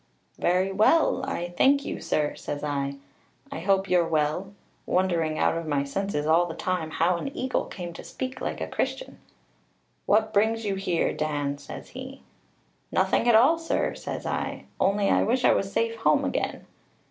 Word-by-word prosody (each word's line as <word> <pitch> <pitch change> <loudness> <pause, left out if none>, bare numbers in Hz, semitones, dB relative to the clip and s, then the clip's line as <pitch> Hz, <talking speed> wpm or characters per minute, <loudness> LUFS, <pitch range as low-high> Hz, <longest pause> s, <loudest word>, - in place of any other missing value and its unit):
'Very 185 +2 +2
well, 255 +7 +3
I 175 -9 -3
thank 280 +6 +4
you, - - -4
sir,' 150 -1 0
says 145 0 -6
I; 140 -1 -2 0.6
'I - - -4
hope 195 +2 +2
you're 175 -3 +3
well;' 155 +4 0 0.4
wondering 170 -4 +1
out - - +2
of 165 -1 -4
my 145 -2 +1
senses 150 +1 -2
all 165 +3 +4
the 165 - -6
time 180 -4 -2
how 170 +2 +1
an 275 - -4
eagle 255 0 -1
came 175 -2 -7
to - - -9
speak 260 0 -6
like - - -3
a - - -3
Christian. - - -3 0.9
'What 220 +1 +3
brings 220 +2 +2
you 200 - 0
here, 190 -3 0
Dan,' 145 -2 -2
says 145 - -9
he. 260 +1 -9 0.7
'Nothing 240 - +2
at 235 - +6
all, 275 +9 +5
sir,' 330 - -1
says - - -6
I; - - -3
'only 200 +1 +2
I - - +3
wish 245 +3 +1
I - - +6
was 195 0 -1
safe 230 +1 0
home 225 - +3
again.' - - -2
185 Hz, 175 wpm, -26 LUFS, 160-225 Hz, 0.9 s, at